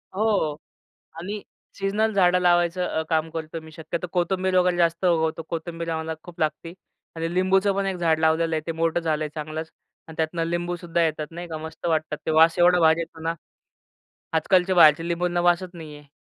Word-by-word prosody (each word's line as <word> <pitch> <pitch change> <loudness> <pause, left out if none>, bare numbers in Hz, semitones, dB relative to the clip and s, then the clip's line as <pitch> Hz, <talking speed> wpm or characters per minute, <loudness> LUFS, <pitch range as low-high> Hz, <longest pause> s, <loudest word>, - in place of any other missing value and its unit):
हो, 200 -8 +1 0.6
आणि 200 +4 -5 0.4
सीझनल 210 +3 0
झाडं 180 -2 +4
लावायचं 175 0 +2
अ, 160 - -1
काम 160 -1 +1
करतो 160 0 -5
मी. 160 - -13
शक्यतो 170 +2 -5
कोथिंबीर 185 +1 0
वगैरे 180 -1 +3
जास्त 170 +1 +1
उगवतो. 165 -2 +1
कोथिंबीर 165 0 -4
आम्हाला 160 0 -3
खूप 175 -2 -13
लागते 160 +2 -2 0.4
आणि 165 +1 -3
लिंबूचं 190 +2 +2
पण 200 0 0
एक 195 - -1
झाड 165 -2 +1
लावलेलं 160 +1 +2
आहे. 155 - -1
ते - - 0
मोठं 165 +1 0
झालं 155 -2 -1
आहे 150 - -3
चांगलंच 155 +1 -5 0.4
आणि 160 - -11
त्यातनं 165 +1 -1
लिंबू 175 +1 -2
सुद्धा 170 0 -2
येतात, 155 -1 -1
नाही 175 +1 -7
का. 160 - -5
मस्त 160 +2 -8
वाटतात 155 -1 -1
ते - - 0
वास 160 +2 +5
एवढा 175 +1 +5
भारी 160 0 +4
येतो 165 -1 -7
ना, 165 +1 -1 1.0
आजकालचे 180 +3 +2
बाहेरचे 165 -1 +6
लिंबूंना 175 0 0
वासचं 175 +1 +1
नाही 155 -2 -9
आहे. 145 - -17
170 Hz, 190 wpm, -24 LUFS, 160-180 Hz, 1.0 s, बाहेरचे